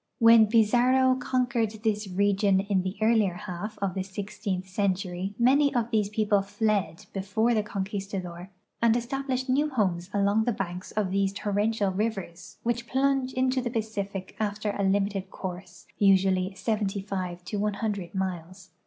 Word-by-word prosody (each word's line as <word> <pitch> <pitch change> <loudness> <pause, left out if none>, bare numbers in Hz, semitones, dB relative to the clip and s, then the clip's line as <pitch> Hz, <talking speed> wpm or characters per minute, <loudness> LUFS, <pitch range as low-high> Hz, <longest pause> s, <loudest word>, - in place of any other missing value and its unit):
When 230 -1 +7
Pizarro 245 +4 +4
conquered 250 -3 0
this 210 -2 0
region 200 +1 +2
in 195 -1 +1
the 185 +1 -4
earlier 215 -5 +3
half 210 +2 -6
of 190 -2 0
the 190 - -2
sixteenth 195 0 -4
century 190 0 -2
many 275 +4 +4
of 235 -1 0
these 210 -3 +1
people 210 -1 +2
fled 205 -4 -1
before 220 +5 +1
the 215 - +2
conquistador 195 -3 -5 0.3
and 235 0 +4
established 260 +1 -2
new 285 +4 +2
homes 190 -9 -1
along 205 +2 +2
the 240 - +1
banks 180 -2 -5
of 205 -3 -1
these 195 0 +1
torrential 205 0 0
rivers, 195 -4 -4
which 235 0 -1
plunge 270 -1 +1
into 255 0 +1
the 245 - -2
Pacific 200 -4 -4
after 210 0 -1
a 200 - -3
limited 195 0 0
course, 180 -1 -8 0.2
usuall}" 190 -1 +3
75 195 -3 -2
to 205 - -3
KK) 205 -3 -2
miles. 185 0 -4
205 Hz, 145 wpm, -27 LUFS, 190-225 Hz, 0.3 s, When